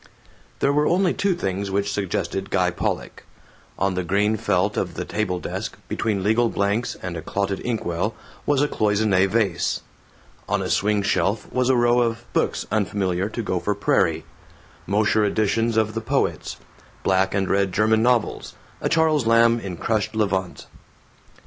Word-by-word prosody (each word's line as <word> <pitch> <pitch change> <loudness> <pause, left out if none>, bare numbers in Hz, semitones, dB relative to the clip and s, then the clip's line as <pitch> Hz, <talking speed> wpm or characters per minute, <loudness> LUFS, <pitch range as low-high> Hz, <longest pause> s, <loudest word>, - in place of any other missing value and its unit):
There 140 - +3
were 150 +1 +2
only 180 0 +2
two 200 -3 +1
things 100 - -2
which 100 +1 0
suggested 95 0 -2
Guy 90 -2 +2
Pollock. - - -3 0.5
On 95 0 +1
the 90 0 -2
green 100 +5 +1
felt 110 - 0
of - - -2
the - - -4
table 95 -4 -2
desk, - - -5
between 100 -4 -1
legal 110 +3 +3
blanks 100 +4 -1
and 90 -2 -4
a 80 - -4
clotted 100 +2 -2
inkwell, 105 -3 -2 0.3
was 145 -1 +3
a - - +2
cloissone 105 -5 +2
vase. 100 -5 0 0.7
On - - +1
a - - -2
swing 105 0 +1
shelf 100 +2 0
was 125 0 +1
a 130 - +4
row 120 0 +3
of 115 0 -1
books - - 0
unfamiliar 95 -2 0
to 115 +1 -4
Gopher 100 +1 -1
Prairie: 100 - +1 0.6
Mosher 105 +2 +2
editions 110 +2 +1
of 110 -1 +2
the 115 - -3
poets, - - -1 0.5
black 95 +1 +2
and 95 -1 +1
red 100 0 +1
German 110 +3 +3
novels, 120 -1 0 0.3
a - - 0
Charles 155 -6 +2
Lamb 115 0 +5
in 95 -5 -6
crushed 110 +3 -1
levant. 95 -4 -1
105 Hz, 160 wpm, -23 LUFS, 95-115 Hz, 0.7 s, Lamb